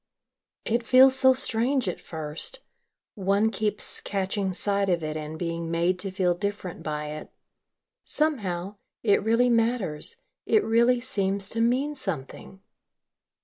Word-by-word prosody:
"It 235 Hz, +2 st, 0 dB
feels 260 Hz, +3 st, +6 dB
so 260 Hz, 0 st, +5 dB
strange 255 Hz, 0 st, +1 dB
at 180 Hz, -, -4 dB
first. 160 Hz, -, -3 dB, 0.5 s
One 200 Hz, +2 st, +1 dB
keeps 210 Hz, -2 st, -2 dB
catching 195 Hz, 0 st, -2 dB
sight 200 Hz, +1 st, +1 dB
of 170 Hz, -3 st, 0 dB
it 155 Hz, 0 st, -3 dB
and 155 Hz, 0 st, -6 dB
being 165 Hz, 0 st, -4 dB
made 170 Hz, +2 st, 0 dB
to 195 Hz, +1 st, -2 dB
feel 185 Hz, -1 st, +1 dB
different 195 Hz, -2 st, -5 dB
by 150 Hz, -1 st, -4 dB
it. 155 Hz, 0 st, -8 dB, 0.7 s
Somehow, 205 Hz, -, -1 dB, 0.3 s
it 205 Hz, -3 st, +3 dB
really 230 Hz, +3 st, +3 dB
matters, 230 Hz, -, +1 dB, 0.3 s
it 435 Hz, -, +3 dB
really 235 Hz, +2 st, +3 dB
seems 200 Hz, -6 st, -1 dB
to 230 Hz, -, -2 dB
mean 255 Hz, +6 st, +1 dB
something." 190 Hz, -, -7 dB
200 Hz, 135 wpm, -26 LUFS, 175-235 Hz, 0.7 s, feels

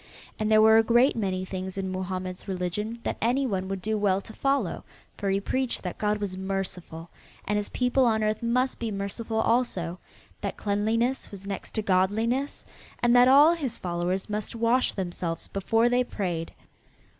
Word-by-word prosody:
And 215 Hz, 0 st, 0 dB
there 215 Hz, 0 st, +6 dB
were 220 Hz, 0 st, +7 dB
a -, -, +4 dB
great 240 Hz, +4 st, +4 dB
many 190 Hz, -4 st, -1 dB
things 190 Hz, 0 st, -5 dB
in 190 Hz, -1 st, -2 dB
Mohammed's 185 Hz, 0 st, -4 dB
religion 195 Hz, +4 st, -3 dB
that -, -, -2 dB
any 250 Hz, +4 st, +2 dB
one 190 Hz, -6 st, -2 dB
would 195 Hz, -1 st, -4 dB
do 215 Hz, 0 st, 0 dB
well 195 Hz, -2 st, +2 dB
to 220 Hz, -, -11 dB
follow, 275 Hz, +3 st, 0 dB, 0.3 s
for 200 Hz, -, -2 dB
he 195 Hz, 0 st, +2 dB
preached 260 Hz, +5 st, -2 dB
that 180 Hz, -, -5 dB
God 210 Hz, 0 st, +1 dB
was 195 Hz, -3 st, -4 dB
merciful 185 Hz, -4 st, -4 dB, 0.4 s
and 210 Hz, -, +1 dB
his 210 Hz, 0 st, -1 dB
people 250 Hz, +1 st, +2 dB
on 220 Hz, -2 st, +2 dB
earth 215 Hz, 0 st, 0 dB
must 250 Hz, +3 st, 0 dB
be 230 Hz, -, -2 dB
merciful 210 Hz, +3 st, -4 dB
also, 185 Hz, -8 st, 0 dB, 0.4 s
that -, -, -3 dB
cleanliness 225 Hz, +5 st, 0 dB
was 200 Hz, -1 st, -10 dB
next 200 Hz, -1 st, -6 dB
to 220 Hz, -, 0 dB
Godliness 220 Hz, +9 st, 0 dB, 0.4 s
and 240 Hz, 0 st, +5 dB
that 245 Hz, 0 st, +7 dB
all 290 Hz, +5 st, +7 dB
his 275 Hz, -9 st, -3 dB
followers 175 Hz, +2 st, -2 dB
must 210 Hz, +1 st, -4 dB
wash 235 Hz, +3 st, +2 dB
themselves 175 Hz, -3 st, -3 dB
before 225 Hz, +4 st, +2 dB
they 245 Hz, +1 st, +3 dB
prayed. 175 Hz, -8 st, -3 dB
210 Hz, 180 wpm, -27 LUFS, 190-235 Hz, 0.4 s, were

